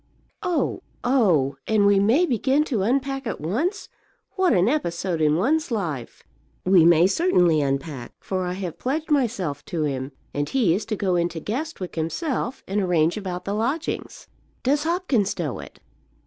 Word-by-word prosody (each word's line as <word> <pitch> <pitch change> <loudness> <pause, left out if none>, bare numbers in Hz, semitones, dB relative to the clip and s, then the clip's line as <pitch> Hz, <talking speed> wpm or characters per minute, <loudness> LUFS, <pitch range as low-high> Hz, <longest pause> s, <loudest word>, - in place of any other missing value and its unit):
"Oh, 355 -2 -1 0.2
oh! 175 - +2
And 215 -2 +3
we 200 -1 +5
may 235 - +4
begin 270 +1 +2
to 250 -9 -1
unpack 270 +4 0
at - - -3
once? 290 - -2 0.4
What 375 -2 +2
an 185 +1 +3
episode 175 - -1
in 150 -1 +3
one's 295 - +1
life!" 165 - -4 0.4
"We 185 -3 +6
may 170 0 +6
certainly 180 - +3
unpack, 135 -2 -3
for 185 -1 -3
I 180 - -2
have 180 -3 -5
pledged 300 +5 -2
myself 210 - 0
to 165 -3 -2
him; 135 -2 -2 0.2
and 145 0 -2
he 230 -11 +2
is 205 +4 -2
to 220 0 -2
go 190 -3 0
into 170 -1 -1
Guestwick 230 - -4
himself 250 - -2
and 205 +2 0
arrange 170 -3 +2
about 185 -4 -5
the 200 - -2
lodgings." 260 +10 -3 0.4
"Does 290 +4 +1
Hopkins 320 - 0
know - - -3
it?" - - -11
200 Hz, 160 wpm, -24 LUFS, 170-270 Hz, 0.4 s, We